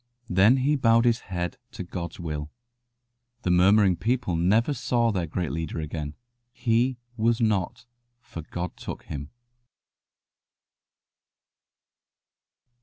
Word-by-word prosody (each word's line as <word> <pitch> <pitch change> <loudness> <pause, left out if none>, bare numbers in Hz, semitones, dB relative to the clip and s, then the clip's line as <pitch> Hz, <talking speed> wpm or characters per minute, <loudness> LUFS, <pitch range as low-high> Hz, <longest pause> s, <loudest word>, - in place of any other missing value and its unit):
Then 100 +8 +5
he 140 +3 +2
bowed 115 -3 +4
his 115 -1 +3
head 90 -2 -4 0.2
to - - -5
God's 85 -2 -6
will. 75 -3 -4 0.9
The 90 - +1
murmuring 95 +1 +5
people 120 -6 0
never 105 - +2
saw 120 -2 +1
their 90 -5 -1
great 85 -1 -2
leader 80 +1 -3
again. 75 -1 -5 0.4
He 120 +2 +1 0.2
"was 115 +1 +2
not, 110 +2 0 0.3
for 85 - -9
God 85 +3 -5
took - - -7
him." 70 0 -6
95 Hz, 110 wpm, -26 LUFS, 85-115 Hz, 0.9 s, Then